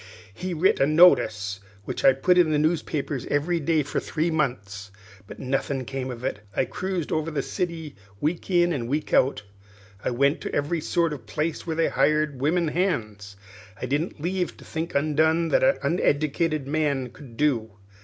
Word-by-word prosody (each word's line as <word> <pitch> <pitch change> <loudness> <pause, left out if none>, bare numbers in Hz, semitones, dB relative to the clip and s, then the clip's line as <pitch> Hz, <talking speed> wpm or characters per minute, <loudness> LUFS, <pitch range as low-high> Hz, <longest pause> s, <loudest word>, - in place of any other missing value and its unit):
He 180 - -4
writ 175 +5 +3
a 135 - +4
notice 120 - +4 0.3
which 130 - -4
I 135 - +7
put 180 +7 +3
into 170 -3 +4
the 155 - +2
newspapers 150 -3 -1
every 165 +4 0
day 160 0 +1
for 145 - -2
three 165 +2 -1
months; 105 -10 -2 0.4
but - - -10
nothin' 135 0 -2
come 130 0 -4
of 120 -1 -7
it. 105 - -2 0.2
I - - +2
cruised 185 -1 -3
over 155 +1 0
the 155 - -2
city 165 -5 -4 0.2
week 165 - -2
in 175 -1 +3
and 120 -6 -3
week 150 +4 -2
out 130 -5 +3 0.6
I - - 0
went 140 +5 +1
to - - -4
every 155 +3 0
sort 165 0 0
of 125 -7 -9
place 155 +10 -3
where 160 - -1
they 165 0 +2
hired 145 -1 +1
women 165 +3 +2
hands; 110 - -2 0.4
I - - -3
didn't 145 +6 -2
leave 180 +3 -1
a - - -13
think 160 +1 -5
undone 160 +3 +2
that - - +3
a 270 +1 +4
uneddicated 155 -2 +1
man 140 -3 0
could 120 -2 -14
do. 115 -8 +1
150 Hz, 180 wpm, -25 LUFS, 130-165 Hz, 0.6 s, I